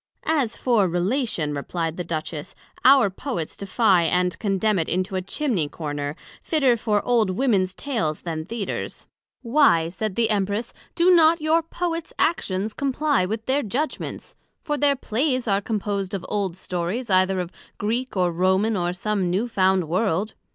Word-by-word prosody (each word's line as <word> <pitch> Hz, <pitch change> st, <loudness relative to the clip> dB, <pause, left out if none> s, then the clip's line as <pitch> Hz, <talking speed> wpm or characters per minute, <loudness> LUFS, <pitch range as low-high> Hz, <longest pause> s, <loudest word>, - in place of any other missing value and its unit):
As 280 Hz, -8 st, +1 dB
for 230 Hz, -6 st, +2 dB
Relation, 180 Hz, -, -1 dB
replied 165 Hz, +3 st, -3 dB
the 180 Hz, -, -4 dB
Duchess, 155 Hz, -2 st, -5 dB, 0.3 s
our 260 Hz, -6 st, +6 dB
Poets 190 Hz, -, -4 dB
defie 195 Hz, -3 st, +2 dB
and 180 Hz, 0 st, 0 dB
condemn 205 Hz, -1 st, +1 dB
it 160 Hz, -, -2 dB
into 185 Hz, +2 st, -1 dB
a 185 Hz, -, 0 dB
Chimney 190 Hz, -, -1 dB
corner, 145 Hz, -2 st, -4 dB, 0.3 s
fitter 275 Hz, -7 st, +2 dB
for 215 Hz, -2 st, 0 dB
old 235 Hz, -5 st, +3 dB
Womens 190 Hz, -3 st, +1 dB
Tales, 170 Hz, -, -2 dB
than 160 Hz, -2 st, -4 dB
Theatres. 220 Hz, +3 st, -5 dB, 0.4 s
Why, 230 Hz, -, +4 dB
said 190 Hz, +2 st, -4 dB
the 225 Hz, -1 st, +2 dB
Empress 205 Hz, +3 st, -1 dB, 0.2 s
do 355 Hz, +1 st, +4 dB
not 330 Hz, 0 st, +6 dB
your 315 Hz, +2 st, +2 dB
Poets 335 Hz, 0 st, -4 dB
Actions 210 Hz, -, 0 dB
comply 280 Hz, -6 st, +1 dB
with 220 Hz, +2 st, -4 dB
their 275 Hz, +2 st, +1 dB
Judgments? 275 Hz, +6 st, -4 dB, 0.3 s
For 295 Hz, -3 st, -1 dB
their 285 Hz, -1 st, +3 dB
Plays 255 Hz, 0 st, -1 dB
are 200 Hz, -1 st, +2 dB
composed 200 Hz, -2 st, -2 dB
of 190 Hz, -, -5 dB
old 195 Hz, -4 st, -2 dB
Stories, 185 Hz, +7 st, -3 dB
either 185 Hz, 0 st, +3 dB
of 180 Hz, -1 st, -4 dB, 0.3 s
Greek 230 Hz, +2 st, -2 dB
or 180 Hz, -1 st, +2 dB
Roman, 190 Hz, +5 st, +2 dB
or 175 Hz, -2 st, 0 dB
some 195 Hz, 0 st, -1 dB
new 195 Hz, +7 st, 0 dB
found 190 Hz, -5 st, +2 dB
World. 190 Hz, +3 st, 0 dB
205 Hz, 160 wpm, -23 LUFS, 180-250 Hz, 0.4 s, our